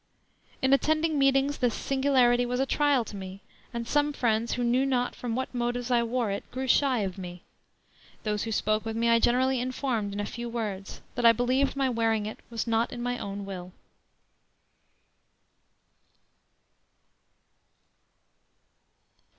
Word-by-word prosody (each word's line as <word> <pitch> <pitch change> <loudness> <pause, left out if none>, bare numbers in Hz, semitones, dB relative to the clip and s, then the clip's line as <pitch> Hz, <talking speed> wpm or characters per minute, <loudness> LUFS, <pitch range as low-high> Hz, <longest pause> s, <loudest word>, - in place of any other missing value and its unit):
"In 265 +1 +4
attending 310 +2 +2
meetings, 275 +1 +2
this 245 -3 +1
singularity 265 -3 +3
was 250 +1 -2
a 270 - +2
trial 285 -3 +2
to 210 - -9
me~.~.~. 190 0 -8 0.3
and 235 -2 -4
some 295 +2 +1
Friends, 230 -3 0
who 245 - -1
knew 245 +2 +2
not 250 -2 0
from 235 -2 -4
what 260 +1 -3
motives 245 0 -2
I 240 -1 +4
wore 235 -2 -1
it, 200 - -3
grew 260 +1 -4
shy 260 -2 +3
of 190 -1 -3
me.~.~.~. 180 -1 -8 0.8
Those 210 -1 -1
who 225 - -3
spoke 215 0 +1
with 225 0 -4
me 230 +1 +1
I 230 0 +5
generally 250 +2 +2
informed, 250 -5 -2
in 200 - -4
a 205 - -1
few 235 +3 -6
words, 210 -5 -5
that 245 - -3
I 230 0 +8
believed 255 +4 +1
my 275 -1 +1
wearing 225 -3 +1
it 215 - -6
was 230 -2 -3
not 230 0 +1
in 240 -1 -5
my 245 0 -2
own 200 0 -5
will." 185 -2 -7
240 Hz, 155 wpm, -28 LUFS, 220-260 Hz, 0.8 s, I